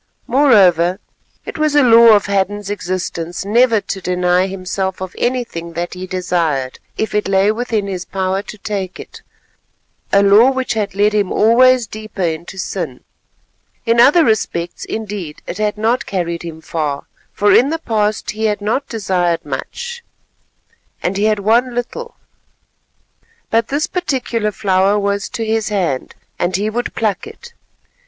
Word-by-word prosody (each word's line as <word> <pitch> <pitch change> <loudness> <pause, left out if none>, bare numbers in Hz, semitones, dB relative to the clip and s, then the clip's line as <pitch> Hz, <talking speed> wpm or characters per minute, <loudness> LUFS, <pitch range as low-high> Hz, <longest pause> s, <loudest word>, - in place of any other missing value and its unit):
Moreover, 190 - +4 0.5
it - - -7
was 305 -1 +1
a 290 - +6
law 230 -2 +8
of 205 - +1
Hadden's 200 0 -1
existence 180 -2 -4
never 230 +2 +4
to 195 0 -5
deny 180 +1 +1
himself 190 0 -3
of 185 -1 -6
anything 230 -10 -2
that 175 +1 -4
he 185 0 -7
desired 170 -8 -1 0.2
if 220 - -2
it 210 0 0
lay 195 +1 +3
within 220 -2 -2
his 185 -2 -4
power 190 +1 -2
to 215 - -10
take 195 -3 -4
it—a 200 0 -5
law 205 +6 +6
which 260 -1 -1
had 205 -3 -2
led 205 +1 +3
him 205 -3 +1
always 250 +2 +5
deeper 215 -3 -6
into 170 +3 -3
sin. 165 -9 -4 0.8
In 230 0 +2
other 290 +7 +6
respects, 175 -6 -1
indeed, 205 -8 -6
it - - -6
had 210 -1 0
not 225 +4 0
carried 170 -3 -2
him 165 -2 -8
far, 150 -3 -3 0.3
for 205 0 +3
in 260 +4 +5
the 325 - -1
past 215 -8 -1
he 220 +1 -3
had 210 -2 0
not 225 +7 -2
desired 185 -6 -1
much, 475 - -6 1.0
and 180 - 0
he 205 +2 +1
had 215 -1 +2
won 235 +4 +2
little; 470 - -5 1.4
but 230 0 +2
this 290 +2 0
particular 250 - -2
flower 195 0 +2
was 200 -1 -1
to 225 - -4
his 220 0 0
hand, 180 -11 -2 0.2
and 175 +1 0
he 210 +3 -1
would 240 +2 -3
pluck 215 - -1
it. 470 +2 -13
205 Hz, 155 wpm, -17 LUFS, 185-230 Hz, 1.4 s, law